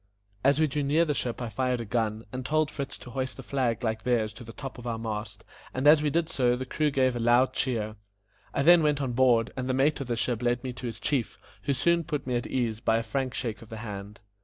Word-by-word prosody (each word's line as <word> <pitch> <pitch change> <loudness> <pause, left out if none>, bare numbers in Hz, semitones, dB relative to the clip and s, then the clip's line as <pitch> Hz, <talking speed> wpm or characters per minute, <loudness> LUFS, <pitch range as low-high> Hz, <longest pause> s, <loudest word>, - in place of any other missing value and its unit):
As 140 +2 +4
we 160 - +5
drew 150 0 -1
near 150 +4 +3
the 150 - 0
ship 125 -3 -3
I 120 - -3
fired 125 +3 0
a 115 - -4
gun, 110 0 -1
and 130 0 -3
told 155 +3 +1
Fritz 140 -1 -5
to 120 - -11
hoist 130 +1 -3
a 135 - -8
flag 125 -2 -1
like 110 -1 -1
theirs 115 -4 +1
to 120 - -10
the 115 - -9
top 135 +1 -8
of 120 - -7
our 115 -1 -1
mast, 110 -1 -5 0.3
and 130 +2 -1
as 150 +1 +8
we 150 - +1
did 165 +2 +1
so 125 -6 +2
the 130 +1 -4
crew 150 +4 0
gave 130 -3 +2
a - - -2
loud 120 +3 +4
cheer. 110 -4 -1 0.5
I 140 - 0
then 175 +2 +8
went 150 -2 +2
on 135 -3 -1
board, 120 -2 +3
and 130 0 -3
the 130 - +1
mate 140 +2 +2
of 135 - -4
the 120 - 0
ship 115 0 -1
led 120 0 +1
me 130 -1 -4
to 125 0 -6
his 115 - -6
chief, 135 -6 -1 0.3
who 140 - +2
soon 170 +5 +2
put 150 -2 -3
me 125 -1 -1
at 120 - -1
my - - -11
ease 115 -4 0
by 115 -1 +2
a 115 - -1
frank 130 +3 -2
shake 115 -4 -3
of 115 - -13
the 110 - -7
hand. 105 -1 -7
125 Hz, 275 wpm, -28 LUFS, 115-140 Hz, 0.5 s, as